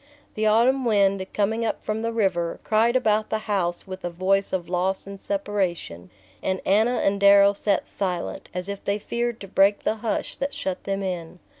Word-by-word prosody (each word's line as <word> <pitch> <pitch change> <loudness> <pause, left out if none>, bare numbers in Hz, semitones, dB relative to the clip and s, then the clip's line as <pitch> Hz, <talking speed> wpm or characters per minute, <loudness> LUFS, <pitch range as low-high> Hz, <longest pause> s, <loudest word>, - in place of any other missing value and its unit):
The 215 0 0
autumn 245 +5 +3
wind, 200 -4 +2
coming 220 +3 0
up 225 - -3
from 215 +1 -2
the 230 0 -1
river, 185 -7 0
cried 225 +3 +2
about 215 -4 +2
the 220 - 0
house 180 -5 -1
with 190 0 -8
a 175 - -2
voice 190 +3 0
of 180 -2 -2
loss 185 +2 -1
and 195 0 -9
separation; 185 - -3 0.3
and 190 0 -1
Anna 220 +5 +3
and 200 0 +1
Darrow 200 0 +7
sat 200 0 0
silent, 180 -3 -4
as 180 +1 -3
if 200 0 -6
they 200 +1 0
feared 235 +2 -3
to 195 - -7
break 195 +2 +3
the 220 - 0
hush 220 -1 -3
that 275 +1 -3
shut 185 -1 -4
them 195 0 -2
in. 180 -2 -4
200 Hz, 190 wpm, -24 LUFS, 190-215 Hz, 0.3 s, Darrow